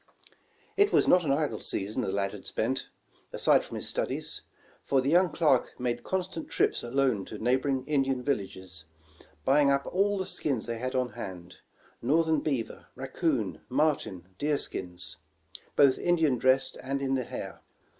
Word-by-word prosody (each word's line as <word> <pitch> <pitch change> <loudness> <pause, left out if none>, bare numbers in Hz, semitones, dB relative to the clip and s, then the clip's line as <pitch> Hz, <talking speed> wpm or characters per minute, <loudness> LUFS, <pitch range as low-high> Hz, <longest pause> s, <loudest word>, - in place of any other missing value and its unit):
It 405 +1 +5
was - - +4
not 180 -2 +5
an 140 - +1
idle 140 -6 0
season 105 +6 -2
the 100 - -1
lad 100 0 0
had - - -9
spent, - - -1 0.4
aside - - +3
from - - -8
his - - -4
studies; - - -3 0.4
for 135 - +2
the 135 +2 +1
young 180 +1 +4
clerk 145 -7 +2
made 120 -1 -1
constant 185 -3 -3
trips - - +1
alone 125 -4 +1
to - - -8
neighboring 130 +2 +1
Indian 135 -3 +1
villages, 95 - -3 0.6
buying 140 +1 +5
up 140 0 +2
all 200 +2 +1
the 190 - -2
skins 135 -10 -1
they 115 -1 -4
had 130 +2 -3
on 125 -1 +1
hand 90 -5 -8 0.2
— - - -31
northern 160 -1 +3
beaver, 135 -7 -3
rac 135 0 -7
coon, 105 - 0
marten 135 - 0
and 95 0 -30
deer 145 0 +1
skins, 90 - -4 0.6
both 140 -2 +5
Indian 160 -8 +2
dressed 130 +1 +2
and 135 +1 -2
in 135 0 0
the 130 -2 0
hair. - - -7
130 Hz, 170 wpm, -29 LUFS, 115-150 Hz, 0.6 s, It